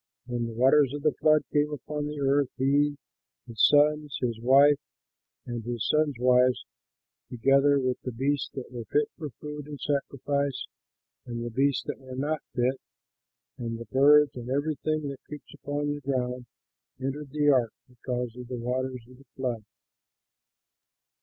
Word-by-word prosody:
When 120 -1 -2
the 115 - -6
waters 135 +3 +4
of 145 - -6
the 155 - +3
flood 155 0 +5
came 150 0 +3
upon 150 +1 -4
the 150 0 -5
earth, 140 0 +2
he, 145 +2 +2 0.5
his 115 -3 -2
sons, 150 -1 +3
his 120 -3 -2
wife, 140 +3 +6 0.7
and 120 -2 -5
his 120 -1 -3
sons' 150 -2 +2
wives, 125 +1 +3 0.6
together 140 +3 +3
with 130 -1 -1
the 125 - -4
beasts 135 +4 -1
that 130 -2 -7
were 120 -2 -6
fit 145 +7 +1
for 155 -3 -6
food 150 +2 -8
and 145 -2 -8
sacrifice 140 -1 -1 0.6
and 120 -1 -4
the 120 - -4
beasts 135 +3 +1
that - - -5
were 130 -1 -9
not 150 +3 -1
fit, 130 +1 0 0.8
and 115 -1 -3
the 115 - -8
birds, 145 +2 +6
and 125 0 -7
everything 150 +2 -1
that 140 - -9
creeps 150 -1 -10
upon 145 0 -3
the 145 - -7
ground, 125 -2 -2 0.5
entered 135 +2 -4
the 145 +1 +2
ark 120 -5 +2 0.2
because 125 -1 -4
of 125 -1 -8
the 125 0 -5
waters 125 +1 -3
of 130 0 -17
the 140 - -18
flood. 125 -4 -3
135 Hz, 160 wpm, -27 LUFS, 125-145 Hz, 0.8 s, wife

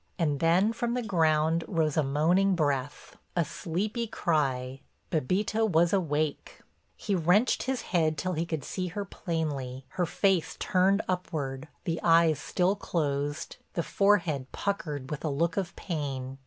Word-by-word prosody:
And 150 -5 0
then 180 +7 +3
from 235 +1 -1
the 250 - -1
ground 160 -4 +2
rose 160 -5 0
a 155 - +4
moaning 170 +8 +2
breath, 145 -3 -2 0.2
a 170 -2 +2
sleepy 190 - -3
cry—Bébita 155 - -1
was 170 +1 +3
awake. 155 -5 -1 0.4
He 205 - -2
wrenched 185 +7 +3
his 265 -3 -1
head 160 -3 +2
till 185 +6 -1
he 165 +1 -2
could 160 -4 -3
see 185 +5 -3
her 200 +4 -4
plainly, 145 -9 -3
her 180 -2 -1
face 190 0 +1
turned 195 +3 +2
upward, 150 -6 -3 0.2
the 165 -1 -2
eyes 165 -2 +4
still 185 +5 +1
closed, 145 -6 -2 0.2
the 170 - -1
forehead 170 -11 +1
puckered 155 -9 -3
with 150 - -4
a 155 - 0
look 165 +4 0
of 190 -3 -2
pain. 135 -6 -4
165 Hz, 145 wpm, -28 LUFS, 145-185 Hz, 0.4 s, a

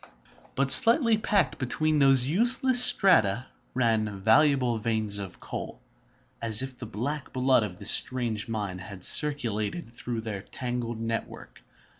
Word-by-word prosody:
But 135 0 -1
tightly 230 - +4
packed 205 -3 -1
between 155 +4 -1
these 135 -2 +4
useless 245 - +4
strata 125 - +4 0.3
ran 110 -5 -1
valuable 125 0 +2
veins 110 -2 -2
of 95 -2 -9
coal, - - -8 0.6
as 115 +2 +2
if 130 -1 -8
the 120 - -8
black 140 +7 -6
blood 130 -1 +1
of 100 -5 -6
this - - 0
strange 120 -4 -1
mine 105 -5 -5
had 95 0 -11
circulated 125 - -1
through 120 -1 -6
their 105 -3 -7
tangled 120 0 -6
network. 115 0 -7
120 Hz, 135 wpm, -26 LUFS, 110-145 Hz, 0.6 s, tightly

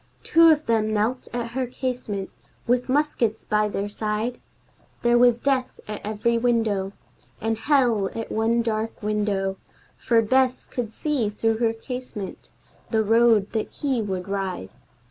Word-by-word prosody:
Two 330 0 +6
of 310 -1 +3
them 220 -2 +1
knelt 220 +4 0
at 235 -1 -3
her 255 +1 -2
casement, 245 -6 -4 0.3
with 250 +1 +1
muskets 255 -6 +1
by 210 0 +1
their 200 0 -2
side; 215 +3 -2 0.6
There 240 0 +4
was 245 -1 +5
Death 265 -2 0
at 210 -1 -5
every 220 +2 0
window, 220 -5 +1 0.5
And 225 +1 0
Hell 235 -6 +2
at 225 - -5
one 230 +2 +1
dark 220 -1 -3
window, 205 -2 0 0.4
For 230 -1 +2
Bess 260 +2 +2
could 235 -4 -4
see, 270 -5 -1
through 225 +1 0
her 230 -1 +2
casement, 235 -4 -7 0.4
the 220 -1 +2
road 225 -1 +4
that 220 -2 -2
he 270 -5 -1
would 190 -3 -3
ride. 195 - -3
225 Hz, 145 wpm, -24 LUFS, 210-245 Hz, 0.6 s, Two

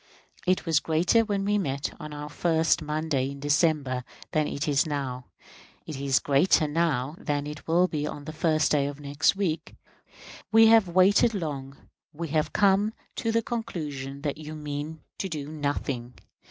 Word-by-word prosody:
It 185 0 +2
was 160 -3 +3
greater 170 +9 +3
when 200 -2 -1
we 205 0 +2
met 140 -6 -2
on 150 - -7
the 150 0 -6
first 160 +2 +1
Monday 150 -3 -1
in 140 0 -8
December 145 -3 +1 0.3
than 155 -1 +1
it 145 +1 -3
is 145 +1 +2
now; 130 -4 -4 0.6
it 155 - -6
is 135 -1 +1
greater 150 +3 +3
now 150 -3 0
than 145 -1 -2
it 150 +1 -8
will 175 +3 +4
be 150 -3 -2
on 145 -1 -7
the 155 - -6
first 155 -1 +1
day 140 -2 +2
of 145 0 -6
next 145 +5 +1
week. 165 -5 -2 0.8
We 225 +1 +7
have 225 -4 +6
waited 195 +6 +4
long; 140 -6 -4 0.4
we 165 +1 -5
have 155 +1 0
come 205 +1 +3 0.2
to 230 - 0
the 230 0 +1
conclusion 145 - -5
that 150 0 -2
you 155 0 -7
mean 150 +1 -5 0.2
to 190 - -2
do 150 -4 -4
nothing. 140 -5 -3
155 Hz, 170 wpm, -27 LUFS, 145-170 Hz, 0.8 s, We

